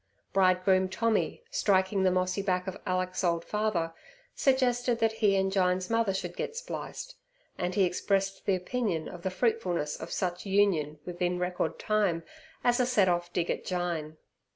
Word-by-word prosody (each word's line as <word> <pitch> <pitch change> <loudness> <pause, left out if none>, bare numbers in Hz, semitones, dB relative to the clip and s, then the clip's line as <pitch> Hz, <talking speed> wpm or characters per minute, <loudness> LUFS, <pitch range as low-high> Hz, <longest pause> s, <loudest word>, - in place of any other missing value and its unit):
Bridegroom 185 0 +3
Tommy, 225 - 0
striking 195 - +2
the 190 - +4
mossy 185 +1 0
back 180 -2 0
of 190 - -4
Alick's 185 0 -1
old 170 -1 +1
father, 210 -6 -1 0.4
suggested 250 -3 +2
that 225 -1 +2
he 215 -3 +2
and 190 0 +1
Jyne's 185 0 +1
mother 230 -3 +2
should 180 -2 -4
get 455 - -4
spliced, - - -6 0.4
and 180 0 -2
he 200 - +4
expressed 195 +2 0
the 195 - +4
opinion 185 -3 -2
of 175 - -9
the 190 - -1
fruitfulness 185 -7 0
of - - -8
such 180 -1 -2
union 190 -7 +2
within 180 0 -1
record 180 -2 -1
time 200 -6 +1 0.4
as 245 0 +3
a 250 - +4
set 210 -7 +3
off 175 0 0
dig 175 -1 0
at - - -3
Jyne. 170 -4 -3
185 Hz, 165 wpm, -29 LUFS, 180-210 Hz, 0.4 s, the